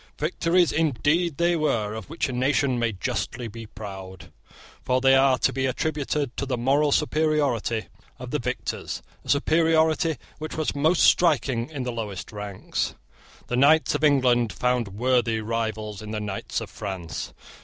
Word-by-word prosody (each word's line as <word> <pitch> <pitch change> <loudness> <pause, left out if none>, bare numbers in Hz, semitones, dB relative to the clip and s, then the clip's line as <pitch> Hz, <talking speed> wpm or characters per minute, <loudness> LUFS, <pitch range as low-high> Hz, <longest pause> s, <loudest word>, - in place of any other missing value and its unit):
Victories 170 +2 +2
indeed 160 +2 +1
they 170 0 +2
were 115 -10 0
of 110 +4 -7
which 165 - -1
a 130 - -5
nation 130 0 +1
may 115 -1 +1
justly 110 +4 -3
be 115 0 -9
proud; 95 -5 -9 0.5
for 130 0 +2
they 135 +1 +5
are 135 -1 +4
to - - +1
be 130 +1 0
attributed 145 -1 -2
to 140 - -2
the 125 -2 -1
moral 140 +5 +2
superiority 145 -8 +1 0.3
of 125 -1 -8
the 150 - 0
victors, 125 +1 -4 0.2
a - - -12
superiority 160 +1 +3 0.2
which 155 0 -5
was 155 - 0
most 160 +5 +3
striking 135 -8 +3
in 145 -5 -5
the 125 - -2
lowest 105 -5 -5
ranks. 105 -2 -4 0.5
The 125 - -2
knights 155 +4 +5
of 145 +1 -2
England 125 -6 +3
found 125 -2 0
worthy 115 +2 +1
rivals 110 -2 -3
in 110 - -8
the 110 0 -3
knights 105 -2 -4
of - - -8
France. 85 -7 -5
130 Hz, 160 wpm, -25 LUFS, 110-150 Hz, 0.5 s, they